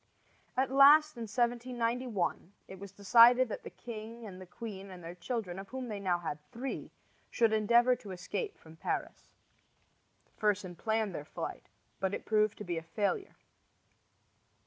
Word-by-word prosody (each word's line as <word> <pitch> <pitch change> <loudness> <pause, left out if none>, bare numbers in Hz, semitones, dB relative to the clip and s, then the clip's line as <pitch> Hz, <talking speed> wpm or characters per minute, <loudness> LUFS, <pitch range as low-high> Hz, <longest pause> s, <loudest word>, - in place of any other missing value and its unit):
At 260 0 +1
last, 295 +3 +7
in 235 -1 -5
1791, 240 -4 -1
it 190 - -10
was 200 -1 -9
decided 235 +5 +6
that - - -5
the - - -8
king 230 0 -8
and 190 -3 -9
the 185 - -10
queen 195 +1 -8
and 180 -2 -10
their 165 +1 -7
children, 185 0 -4
of 195 - -8
whom 260 -1 -5
they 210 -2 -4
now 185 -3 +1
had 160 -3 -4
three, 255 +3 -5 0.4
should 230 -2 +2
endeavor 235 +4 +4
to 205 - -12
escape 190 - -4
from 160 0 -16
Paris. - - -4 1.1
Fersen 200 -4 0
planned 220 0 -1
their 150 - -5
flight, 150 - -6 0.3
but 190 0 0
it - - -8
proved 215 -1 +2
to - - -6
be 175 -4 -2
a - - -11
failure. 205 - -2
215 Hz, 160 wpm, -32 LUFS, 185-240 Hz, 1.1 s, last